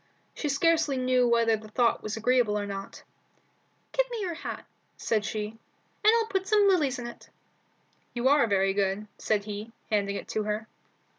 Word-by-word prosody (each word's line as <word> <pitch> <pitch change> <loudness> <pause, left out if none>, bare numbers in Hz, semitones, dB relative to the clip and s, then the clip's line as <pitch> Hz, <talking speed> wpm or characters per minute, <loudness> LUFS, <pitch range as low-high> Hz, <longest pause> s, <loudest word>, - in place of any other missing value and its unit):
She 300 - -3
scarcely 315 0 +2
knew 255 -1 +3
whether 230 -1 +3
the 215 0 -10
thought 235 +2 +1
was 215 +1 -4
agreeable 235 -2 +2
or 205 - -2
not. 195 -1 -7 0.9
"Give - - +1
me 475 -2 -4
your 360 -3 -2
hat," 325 - -6 0.3
she - - -11 0.2
said, 205 - -5
"and 215 +1 -4 0.5
I'll 460 0 +3
put 385 -3 -2
some 415 -1 +4
lilies 305 -9 +2
in 245 - -6
it." 240 - -10 0.9
"You 240 +2 +1
are 280 -3 +5
very 195 -1 +2
good," 195 +1 0
said 210 -2 0
he, 210 +2 -6 0.2
handing 200 -1 +1
it - - -6
to 215 - -1
her. 210 +1 -3
235 Hz, 175 wpm, -28 LUFS, 210-290 Hz, 0.9 s, are